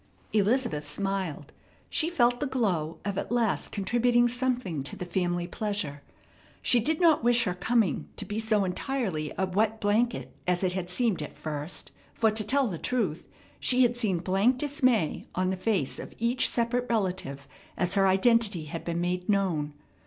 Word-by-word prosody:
Elizabeth 215 Hz, -, +2 dB
smiled. 185 Hz, -2 st, -3 dB, 0.4 s
She 325 Hz, -, +1 dB
felt 245 Hz, -7 st, +2 dB
the 290 Hz, -, -1 dB
glow 185 Hz, -12 st, -1 dB
of 200 Hz, -1 st, -1 dB
at -, -, -5 dB
last 235 Hz, -4 st, +1 dB
contributing 240 Hz, +4 st, +2 dB
something 245 Hz, -, -1 dB
to 135 Hz, -, -5 dB
the 180 Hz, -, -5 dB
family 175 Hz, -1 st, -1 dB
pleasure. 180 Hz, -7 st, -3 dB, 0.6 s
She 245 Hz, -, +5 dB
did 305 Hz, +7 st, 0 dB
not 325 Hz, -7 st, +4 dB
wish 240 Hz, 0 st, +4 dB
her 180 Hz, -5 st, -1 dB
coming 215 Hz, +2 st, 0 dB
to -, -, -4 dB
be 210 Hz, +1 st, -3 dB
so 220 Hz, -3 st, +1 dB
entirely 185 Hz, -, -2 dB
a 190 Hz, -, +1 dB
wet 210 Hz, +4 st, 0 dB
blanket 225 Hz, +4 st, 0 dB
as 180 Hz, +1 st, +1 dB
it 180 Hz, -1 st, +1 dB
had 180 Hz, -1 st, -3 dB
seemed 200 Hz, -3 st, +1 dB
at 150 Hz, -, -7 dB
first; 150 Hz, +2 st, -4 dB, 0.2 s
for, 225 Hz, -1 st, +3 dB
to 215 Hz, 0 st, +1 dB
tell 270 Hz, +6 st, +2 dB
the 180 Hz, -9 st, -3 dB
truth, 205 Hz, -11 st, -1 dB, 0.3 s
she 255 Hz, 0 st, +4 dB
had 240 Hz, 0 st, +2 dB
seen 215 Hz, -7 st, 0 dB
blank 195 Hz, +8 st, +2 dB
dismay 255 Hz, -, +1 dB
on 185 Hz, +1 st, +1 dB
the -, -, -1 dB
face 185 Hz, -7 st, 0 dB
of -, -, -9 dB
each 235 Hz, +2 st, +1 dB
separate 245 Hz, +1 st, 0 dB
relative 185 Hz, -11 st, -2 dB, 0.3 s
as 180 Hz, 0 st, +1 dB
her 195 Hz, -1 st, +4 dB
identity 200 Hz, -3 st, +3 dB
had 165 Hz, +2 st, -6 dB
been 170 Hz, 0 st, -2 dB
made 180 Hz, +1 st, -2 dB
known. 170 Hz, -8 st, 0 dB
205 Hz, 175 wpm, -28 LUFS, 180-240 Hz, 0.6 s, She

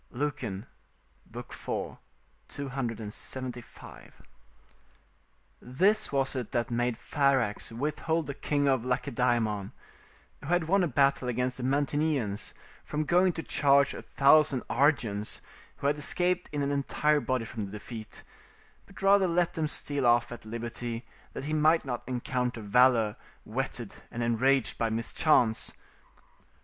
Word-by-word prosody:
Lucan, 120 Hz, -7 st, -3 dB, 0.7 s
iv. -, -, -7 dB, 1.0 s
275.] 125 Hz, -1 st, -6 dB, 1.4 s
This 195 Hz, -, +1 dB
was 135 Hz, -1 st, +1 dB
it 125 Hz, -4 st, -4 dB
that 120 Hz, -1 st, -1 dB
made 120 Hz, 0 st, 0 dB
Pharax 135 Hz, -9 st, 0 dB
withhold 150 Hz, +6 st, -1 dB
the 140 Hz, -, -4 dB
King 145 Hz, +1 st, 0 dB
of 130 Hz, -4 st, +2 dB
Lacedaemon, 120 Hz, -5 st, 0 dB, 0.7 s
who -, -, -10 dB
had 175 Hz, 0 st, +2 dB
won 195 Hz, +2 st, +3 dB
a -, -, +2 dB
battle 135 Hz, -2 st, +2 dB
against 125 Hz, +1 st, -1 dB
the 125 Hz, -, -5 dB
Mantineans, 140 Hz, -5 st, 0 dB, 0.3 s
from 150 Hz, +1 st, -2 dB
going 180 Hz, +3 st, +4 dB
to 165 Hz, -, -5 dB
charge 140 Hz, -1 st, +3 dB
a -, -, -7 dB
thousand 140 Hz, -1 st, +4 dB
Argians, 110 Hz, -8 st, +1 dB, 0.4 s
who -, -, -9 dB
had 145 Hz, +1 st, +2 dB
escaped 180 Hz, +4 st, +1 dB
in 145 Hz, -1 st, -1 dB
an 140 Hz, -, 0 dB
entire 150 Hz, +2 st, +1 dB
body 130 Hz, -4 st, -1 dB
from 110 Hz, -2 st, -5 dB
the -, -, -11 dB
defeat, 110 Hz, +1 st, -9 dB, 0.6 s
but 195 Hz, 0 st, -12 dB
rather 195 Hz, -1 st, +5 dB
let 175 Hz, 0 st, +1 dB
them 160 Hz, -1 st, -1 dB
steal 145 Hz, -3 st, -1 dB
off 120 Hz, 0 st, +3 dB
at 120 Hz, -2 st, -9 dB
liberty 115 Hz, +1 st, -5 dB, 0.3 s
that -, -, -5 dB
he 155 Hz, -, -2 dB
might 155 Hz, +1 st, +3 dB
not 120 Hz, -3 st, -3 dB
encounter 125 Hz, -2 st, -2 dB
valour 115 Hz, 0 st, +4 dB, 0.3 s
whetted -, -, -4 dB
and 120 Hz, -, -4 dB
enraged 125 Hz, +3 st, +2 dB
by 115 Hz, -, +1 dB
mischance. 115 Hz, +1 st, +2 dB
130 Hz, 130 wpm, -29 LUFS, 120-150 Hz, 1.4 s, rather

